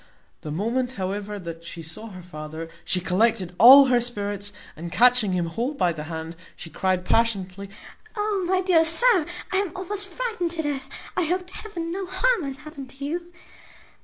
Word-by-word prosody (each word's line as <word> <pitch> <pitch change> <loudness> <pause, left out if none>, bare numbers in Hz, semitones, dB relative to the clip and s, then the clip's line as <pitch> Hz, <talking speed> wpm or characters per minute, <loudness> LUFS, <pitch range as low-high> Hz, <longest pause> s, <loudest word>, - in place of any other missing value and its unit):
The 155 - -7
moment, 240 +9 -1
however, 205 +1 -4
that 170 -3 -8
she 170 0 -8
saw 160 +8 -7
her 185 -4 -10
father, 160 -1 -8
she 185 - +1
collected 190 +1 +1
all 270 +5 +10
her 250 -2 +3
spirits, 205 -4 -3 0.2
and, 170 +2 -7
catching 240 -1 +4
him 175 -2 0
hold 235 - -3
by 175 -8 +2
the 150 -1 -6
hand, 160 0 -6 0.2
she 165 - -9
cryed 185 -1 0
passionately, 200 -4 0 0.5
"O 415 -2 0
my 370 0 +2
dear 360 -3 +4
sir, 350 +2 +5 0.3
I - - +3
am 390 -3 0
almost 395 +2 -2
frightened 445 -3 -3
to 320 - -1
death! 275 -2 -3 0.3
I 360 - +1
hope 365 +3 0
to 360 - -11
heaven 340 -6 -5
no 380 +1 -4
harm 380 0 +1
hath 275 +1 -6
happened 295 -4 -9
to 275 +2 -7
you." 345 +4 -4
245 Hz, 185 wpm, -24 LUFS, -, 0.5 s, all